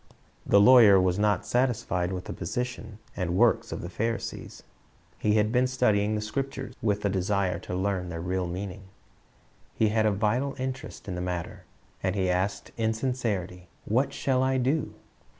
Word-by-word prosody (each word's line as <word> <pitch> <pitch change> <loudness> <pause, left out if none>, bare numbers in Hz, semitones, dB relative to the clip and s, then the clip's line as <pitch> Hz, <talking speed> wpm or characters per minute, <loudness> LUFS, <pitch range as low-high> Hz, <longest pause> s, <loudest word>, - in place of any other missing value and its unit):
The 100 - +6
lawyer 110 -3 +8
was 90 +1 +1
not 105 -2 +1
satisfied 110 -8 0
with 90 -1 -5
the - - -5
position 115 +2 -4 0.2
c^id 90 -3 -2
works 115 +5 +2
of - - -4
the - - -4
Pharisees. 115 +5 -4 0.6
He 105 0 +2
had 105 0 +2
been 125 +1 +3
studying 110 -5 +1
the 105 - -2
Scriptures 135 +4 -4
with 105 -2 0
a - - +4
desire 95 -1 0
to 90 - -6
learn 95 -1 -1
their 85 -1 -5
real 90 +1 -2
meaning. 95 +2 -6 0.9
He 110 - +2
had 110 0 +2
a - - +3
vital 115 +7 0
interest 130 0 -6
in 95 - -3
the 90 - -4
matter, 90 -2 -4 0.4
and 95 0 -1
he 95 -2 +1
asked 95 +3 -2
in 110 -1 0
sincerity, 105 -8 -3 0.2
"What 130 +6 +1
shall 130 -2 0
I 130 0 +2
do?" 135 +5 0
105 Hz, 170 wpm, -27 LUFS, 95-125 Hz, 0.9 s, lawyer